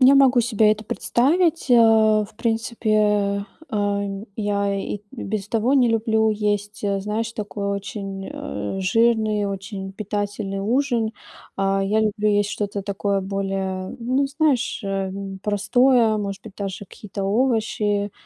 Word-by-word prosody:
Я 260 +2 +7
могу 265 -3 +6
себе 220 -2 +3
это 215 0 -6
представить. 310 - +1
Э, 245 - +7 0.5
в 215 - -15
принципе, 215 -3 +1 0.3
э, 200 -1 -1
я 200 -1 0
и 195 - -4
и 205 - -17
без 215 -5 -4
того 230 +5 +1
не 250 -3 +4
люблю 220 -1 +2
есть, 205 0 -2
э, 200 -1 0
знаешь, 215 +3 -2
такой 205 -2 -4
очень, 195 -1 -5
э, 105 - -5
жирный, 215 +1 +2
очень 195 0 -5
питательный 205 -1 -3
ужин. 235 0 +1 0.4
А, 195 0 +1
я 215 +3 +2
люблю 215 0 +1
есть 205 0 +2
что-то 205 -2 -3
такое 200 0 -1
более, 195 -1 -3
ну, 255 +4 +1
знаешь, 285 -4 0
эм, 195 0 -4
простое, 220 +3 +3
может 200 -2 -4
быть, 210 -3 -11
даже 200 0 -5
какие-то 200 0 -7
овощи 210 -2 +1
210 Hz, 140 wpm, -22 LUFS, 195-225 Hz, 0.5 s, Я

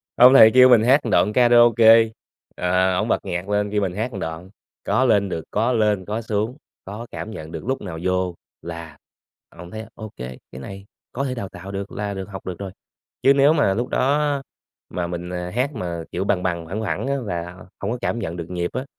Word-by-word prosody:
ông 125 +2 +8
thầy 110 -5 +9
kêu 130 +1 +7
mình 120 -3 +6
hát 135 +5 +5
một - - -1
đoạn 105 - +3
karaoke, 120 -2 +6 0.5
ờ, 90 +1 +1
ổng - - 0
bật - - 0
nhạc 90 +3 -4
lên 105 0 0
kêu 105 -1 0
mình 95 -2 -1
hát 110 +6 -3
một - - -7
đoạn, 80 +3 -6 0.3
có 130 - +2
lên 100 -5 +3
được, 80 -3 -4
có 115 +4 +1
lên 105 -4 +1
có 105 +4 -3
xuống, 110 +3 -2 0.3
có 105 +5 -7
cảm 110 - -6
nhận 80 -6 -8
được, - - -7
lúc 130 +2 -2
nào 85 -5 -6
vô 90 -1 0 0.3
là 85 -2 -8 0.6
ổng 85 +1 -10
thấy: 110 0 -7
"Ô 110 -2 -9
kê, 65 0 -7
cái 65 - -9
này 95 +7 -9 0.3
có 135 - -3
thể 130 -2 -2
đào 100 -6 -5
tạo 95 +3 -10
được, 100 0 -5
là 105 -1 -4
được 95 0 -6
học 95 -2 -9
được 90 -2 -6
rồi." 100 -2 -6 0.5
Chứ 135 - +6
nếu 140 +2 +5
mà 145 -11 +2
lúc 120 +4 -2
đó 140 +3 +1
á, 145 -2 0 0.5
mà 90 -1 -3
mình, 85 0 -5
à, 90 0 -4
hát 130 +4 0
mà, 85 -6 -4
kiểu, 90 +2 -2
bằng 95 -2 0
bằng 85 -2 -2
phẳng 100 +6 -4
phẳng 110 - -2
á, 140 - 0
là 85 -3 -4 0.3
hông 100 - -2
có 125 - -3
cảm 120 -1 -2
nhận 85 -7 -4
được 85 -1 -7
nhịp 90 -1 -2
á, 130 +2 -3
100 Hz, 235 wpm, -22 LUFS, 90-120 Hz, 0.6 s, thầy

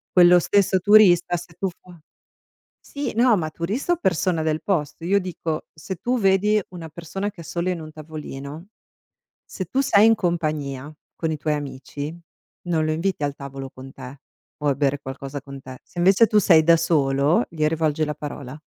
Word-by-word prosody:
Quello 180 -1 +7
stesso 195 +1 +2
turista 180 -3 +5
se 175 0 -11
tu 190 +3 -2
fo 175 0 -17 0.8
sì, 285 -3 -5
no, 235 -1 +4
ma 160 -3 -2
turista 205 - -1
o - - +1
persona 180 - 0
del 155 0 -1
posto. 165 -4 -2
Io 200 +3 +3
dico, 170 -4 -4
se 160 +4 -7
tu 245 +6 -1
vedi 205 +1 +3
una 170 -3 -9
persona 170 +5 -5
che 195 -4 -12
è - - -9
solo 170 +3 -2
in 180 -2 -2
un 155 -1 -9
tavolino, 155 +1 -8 0.7
se 185 - -6
tu 260 +11 0
sei 215 -6 +5
in 225 - +7
compagnia 155 -7 -2 0.3
con 160 -1 -2
i - - -1
tuoi 150 +1 -1
amici, 145 +2 -6 0.5
non 160 -3 +1
lo 155 - 0
inviti 165 +1 -1
al 145 -1 -1
tavolo 135 -1 -8
con 130 +1 -11
te 130 +1 -10 0.4
o 150 - -1
a 140 - +2
bere 140 0 0
qualcosa 135 +1 -6
con 140 0 -10
te. 130 -1 -11
Se - - -19
invece 195 +6 +5
tu 215 - +2
sei 165 -6 +6
da 170 +1 +6
solo, 150 - +2
gli 155 -2 -1
rivolgi 155 0 +1
la 150 - -3
parola. 145 -2 -7
165 Hz, 190 wpm, -23 LUFS, 145-185 Hz, 0.8 s, Quello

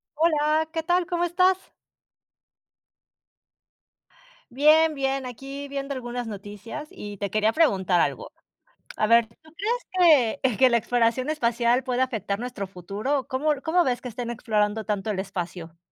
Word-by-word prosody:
Hola, 310 0 +2
¿qué 325 -1 -3
tal? 350 +1 +2
¿Cómo 350 -2 -1
estás? 365 +2 +3 2.9
Bien, 310 +4 +5
bien, 270 -1 -1
aquí 275 +3 -7
viendo 275 0 -4
algunas 245 -1 -5
noticias, 210 +7 -8
y 205 -1 -9
te 200 +1 -3
quería 215 +2 +2
preguntar 195 - +2
algo, - - -1 0.7
a 215 - +1
ver, 230 0 +4
¿tú 315 +8 -23
crees 355 - +2
que 255 -5 +1
que 260 - +6
la 235 - +3
exploración 240 +3 +1
espacial 240 -3 +1
pueda 255 -1 0
afectar 215 -5 -2
nuestro 240 -5 -5
futuro? 205 +10 -3
¿Cómo 290 +3 +1
l 280 - -5
cómo 345 +2 +2
ves 245 -1 0
que 250 - -6
estén 235 0 -5
explorando 220 -2 0
tanto 210 0 -2
el 195 -3 -1
espacio? 175 -3 -6
250 Hz, 145 wpm, -25 LUFS, 215-300 Hz, 2.9 s, que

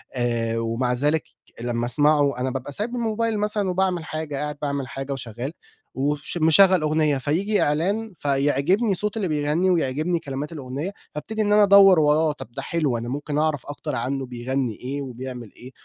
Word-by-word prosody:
آآ، 115 -2 0
ومع 115 +2 0
ذلك 150 +5 +1 0.4
لمّا 120 0 -1
أسمعه 145 +1 +2
أنا 130 +1 0
بابقى 135 +2 -5
سايب 210 - -2
بالموبايل 230 -2 -1
مثلًا 210 -2 0
وباعمل 180 -2 0
حاجة 155 -2 -4
قاعد 150 +1 -3
باعمل 140 -3 -2
حاجة 135 +3 -5
وشغال، 125 +1 -5 0.4
وش 145 +4 -1
مشغل 175 +2 +5
أغنية 155 -1 +2
فييجي 180 +10 0
إعلان 195 +9 0
فيعجبني 145 - +1
صوت 210 +4 -1
اللي 200 -4 0
بيغني 155 +4 +1
ويعجبني 165 +1 +1
كلمات 140 +1 -5
الأغنية، 145 +3 -5 0.2
فابتدي 215 +9 -3
إن 205 -1 +2
أنا 210 0 +6
أدوّر 195 -3 +7
وراه، 150 +1 +3
طَب 130 -5 -9
ده 135 +3 -5
حلو 145 -4 0
أنا 115 +1 -5
ممكن 145 +2 -3
أعرف 155 -4 0
أكتر 145 - -5
عنه 135 +3 -2
بيغني 125 0 -2
إيه 135 +5 -5
وبيعمل 125 -3 -7
إيه، 125 +2 -12
145 Hz, 170 wpm, -23 LUFS, 130-180 Hz, 0.4 s, أدوّر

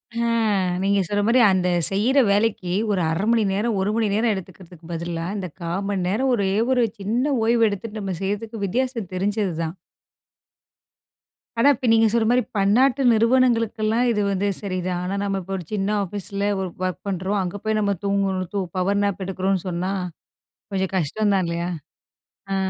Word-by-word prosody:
ஆ, 235 0 0 0.5
நீங்க 200 +1 +2
சொல்றமாரி 205 +5 +2
அந்த 185 -1 +1 0.2
செய்யிற 225 +8 +2
வேலைக்கி 200 -3 +1 0.2
ஒரு 190 -3 +1
0:30 165 +4 -1
மணி 230 -2 +3
நேரம் 210 +2 0
1 190 +2 0
மணி 225 -1 +1
நேரம் 225 +2 +2
எடுத்துக்கிறதுக்கு 180 -3 -10
பதிலா, 165 0 -3
இந்த 190 -2 -4
0:15 175 +4 -3
மணி 190 -3 -1
நேரம் 255 +7 +1
ஒரே 200 -4 0 0.2
ஒரு 250 -2 +3 0.2
சின்ன 240 +8 0
ஓய்வு 230 0 +4
எடுத்துட்டு 210 +2 -5
நம்ம 195 -2 -3
செய்யிறதுக்கு 205 +2 -3
வித்தியாசம் 235 -1 -2
தெரிஞ்சது 200 0 0
தான். 160 +3 -4 1.8
ஆனா, 235 - +5
இப்போ 250 - -3
நீங்க 225 0 +5
சொல்ற 230 -1 +2
மாரி 250 +1 +4 0.2
பன்னாட்டு 245 +8 +3
நிறுவனங்களுக்கெல்லாம், 230 -1 +2
இது 210 -2 0
வந்து 195 +1 0
சரிதான். 185 -3 -2
ஆனா 190 +2 -2
நம்ம 195 -1 -1
இப்போ 190 +2 -6
ஒரு 180 - -7
சின்ன 200 -1 0
ஆஃபீஸில 200 +1 -3
ஒரு 190 -1 -2 0.2
ஒர்க் 185 -2 -3
பண்ணுறோம். 195 +1 -1
அங்க 180 +2 -4
போய் 215 0 0
நம்ம 200 -1 +1
தூங்கணும். 195 -2 0
தூ 200 - 0 0.2
பவர் 200 +2 +1
நாப் 200 -1 -1
எடுக்குறோன்னு 190 0 -1
சொன்னா 180 +2 -2 0.8
கொஞ்சம் 190 -1 -1
கஷ்டம் 200 +5 0
தான் 190 -1 +2
இல்லையா? 170 +1 -2 0.8
ஆ. - - +1
200 Hz, 165 wpm, -23 LUFS, 185-225 Hz, 1.8 s, ஆனா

